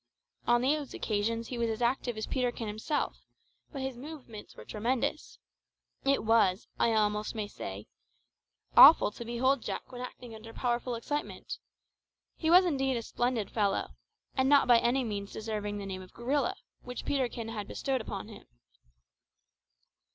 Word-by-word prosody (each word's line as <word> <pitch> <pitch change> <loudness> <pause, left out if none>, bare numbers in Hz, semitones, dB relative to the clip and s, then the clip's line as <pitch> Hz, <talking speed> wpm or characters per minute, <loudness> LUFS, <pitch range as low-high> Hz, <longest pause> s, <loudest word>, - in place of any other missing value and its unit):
On 240 0 +4
those 290 +1 0
occasions 225 +2 -1
he 245 - -4
was 230 -1 +1
as 220 - -2
active 245 -1 0
as 220 - -2
Peterkin 245 -3 -1
himself, 215 +8 -2 0.5
but 275 -3 -5
his 265 -2 -4
movements 260 -7 -10
were - - -11
tremendous. 245 +7 -2 0.7
It 275 0 +2
was, 215 -3 +3
I - - +4
may 225 - +2
almost 210 +1 +1 0.2
say, 95 +2 -7 0.9
awful - - +9
to 235 - -8
behold 245 +3 +1
Jack - - -5
when 250 -1 -7
acting 250 -2 -8
under 225 +1 -10
powerful 240 0 -1
excitement. 290 +6 -4 0.8
He 320 - -1
was 360 +2 +8
indeed 270 -6 +1
a 230 - -4
splendid 240 -3 -1
fellow, 205 -3 0 0.4
and 265 0 +2
not 285 -2 +6
by 240 -2 +7
any 250 +3 +2
means 200 -3 -4
deserving 210 -2 -3
of 205 - -4
the - - -5
name 190 -1 -5
of 185 - -13
gorilla, 260 +3 0 0.3
which 250 0 -7
Peterkin 245 -5 -1
had 210 -3 -5
bestowed 265 -3 -1
on 200 0 -5
him. 220 - -12
235 Hz, 160 wpm, -30 LUFS, 215-265 Hz, 0.9 s, awful